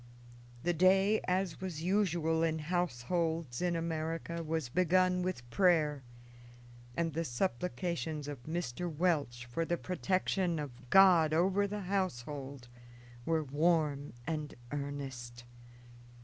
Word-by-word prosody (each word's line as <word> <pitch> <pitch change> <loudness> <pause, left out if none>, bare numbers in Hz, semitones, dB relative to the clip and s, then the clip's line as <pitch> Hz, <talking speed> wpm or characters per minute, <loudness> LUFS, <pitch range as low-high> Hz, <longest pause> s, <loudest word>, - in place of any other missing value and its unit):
The 175 +1 +2
day, 190 +5 +4
as 185 -1 0
was 170 -4 -4
usual 170 -4 +1
in 160 -1 +1
households 165 -2 -1
in 175 -1 +1
America, 165 0 -3
was 160 -3 -2
begun 180 +5 +3
with 180 -10 -3
prayer, 155 -4 +3 1.0
and 165 -2 0
the 165 +2 -1
supplications 160 +2 -2
of 145 -4 -6
Mr. 170 0 -3
Welch 145 -7 0
for 120 +7 -2
the 170 +1 -1
protection 185 -1 0
of 125 -4 -7
God 175 -4 +6
over 190 +4 +3
the 205 +1 -4
household 145 -8 -3 0.6
were 160 -1 +2
warm 150 -1 +1
and 150 -2 -3 0.2
earnest. 135 -4 -5
165 Hz, 115 wpm, -33 LUFS, 145-180 Hz, 1.0 s, God